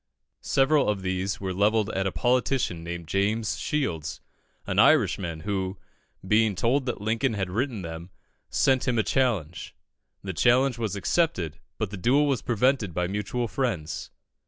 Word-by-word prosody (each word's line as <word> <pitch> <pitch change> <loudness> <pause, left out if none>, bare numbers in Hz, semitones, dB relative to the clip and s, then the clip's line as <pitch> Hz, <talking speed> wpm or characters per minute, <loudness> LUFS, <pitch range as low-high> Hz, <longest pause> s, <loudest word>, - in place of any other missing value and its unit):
Several 135 -1 +3
of 100 -2 -1
these 95 +1 -2
were 95 -1 -3
levelled 105 +2 +2
at 95 0 -1
a - - -1
politician 125 -8 0
named 85 -1 -6
James 100 +4 0
Shields, 85 - -2 0.5
an - - -1
Irishman, 85 -4 +3
who, 95 -1 -2 0.5
being 105 0 +3
told 125 +8 +1
that 125 - -2
Lincoln 110 +3 0
had 95 -3 -2
written 115 -1 -2
them, 85 +1 -7 0.4
sent 130 -2 +2
him 125 -2 +1
a 110 - +3
challenge. 105 - -1 0.5
The 95 -1 -4
challenge 125 - +3
was 110 -4 -2
accepted, 95 - 0 0.2
but 110 -4 -2
the 100 - -5
duel 130 +10 +3
was 135 -4 0
prevented 120 - +1
by 90 - +1
mutual 105 +6 -2
friends. 105 - -3
105 Hz, 155 wpm, -26 LUFS, 95-125 Hz, 0.5 s, Several